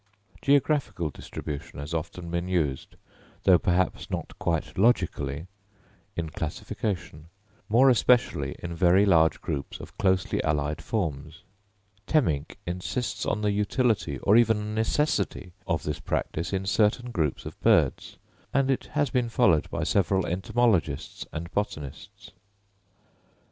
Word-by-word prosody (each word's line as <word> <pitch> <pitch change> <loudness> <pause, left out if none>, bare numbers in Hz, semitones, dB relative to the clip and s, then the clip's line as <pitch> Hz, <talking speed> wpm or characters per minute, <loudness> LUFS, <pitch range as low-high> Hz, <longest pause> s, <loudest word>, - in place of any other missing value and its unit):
Geographical 135 - +1
distribution 70 +1 -7
has 70 +3 -6
often 85 +1 -4
been 85 +1 -2
used, 80 -8 -1 0.5
though 90 -3 +6
perhaps 90 +1 0
not - - -4
quite 80 -2 -1
logically, 85 - +1 0.7
in 85 -1 -2
classification, 85 0 -4 0.4
more 120 +5 +5
especially 115 - +3
in 85 -1 -6
very 90 +4 +4
large 80 -4 +4
groups 70 -1 -4
of - - -11
closely 95 -2 +1
allied 75 0 -1
forms. 80 -11 -3 0.6
Temminck 80 - +1
insists 100 +6 -3
on 105 - 0
the 105 -1 +1
utility 105 - 0
or 100 - +5
even 110 -2 +3
necessity 110 -5 0 0.2
of 85 -4 0
this 75 -1 -3
practice 80 - -2
in 95 -1 -1
certain 110 +4 +1
groups 80 - -1
of - - -8
birds; - - +2 0.3
and 135 -1 +2
it 135 - -1
has 145 -3 +2
been 125 -2 +1
followed 115 -10 +3
by - - -2
several 95 -2 +2
entomologists 95 +2 0
and 85 +2 -6
botanists. 75 -9 -5
95 Hz, 125 wpm, -27 LUFS, 80-110 Hz, 0.7 s, though